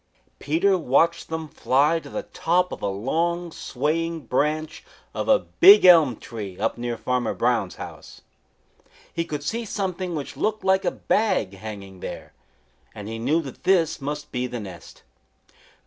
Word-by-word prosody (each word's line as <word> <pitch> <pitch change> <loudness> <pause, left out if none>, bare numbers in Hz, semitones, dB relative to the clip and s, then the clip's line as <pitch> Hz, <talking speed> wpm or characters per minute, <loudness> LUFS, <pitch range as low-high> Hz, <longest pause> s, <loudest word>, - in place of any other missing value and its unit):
Peter 180 +6 +2
watched 165 +4 +2
them 160 -1 -4
fly 145 +3 +2
to - - -12
the - - -4
top 180 +2 0
of - - -7
a - - -1
long, 165 - -1
swaying 160 +5 -2
branch 150 +5 -1 0.3
of - - -3
a - - +7
big 400 - +6
elm 160 -9 +7
tree 105 -6 -8
up 110 +2 -1
near 120 0 -4
Farmer 125 -2 -1
Brown's 115 -6 0
house. - - -10 0.9
He 165 - -1
could 150 -3 -5
see 230 +9 -2
something 185 -4 -3
which 145 -3 -5
looked 215 0 -1
like 190 0 +2
a - - +3
bag 205 - 0
hanging 100 -2 -9
there, - - -8 0.6
and 105 -1 -8
he 115 +1 -5
knew 150 +8 +1
that 135 -4 -10
this 170 -4 +2
must 145 +1 -5
be 125 0 -2
the 120 -1 -5
nest. 95 -5 -11
150 Hz, 160 wpm, -24 LUFS, 120-170 Hz, 0.9 s, a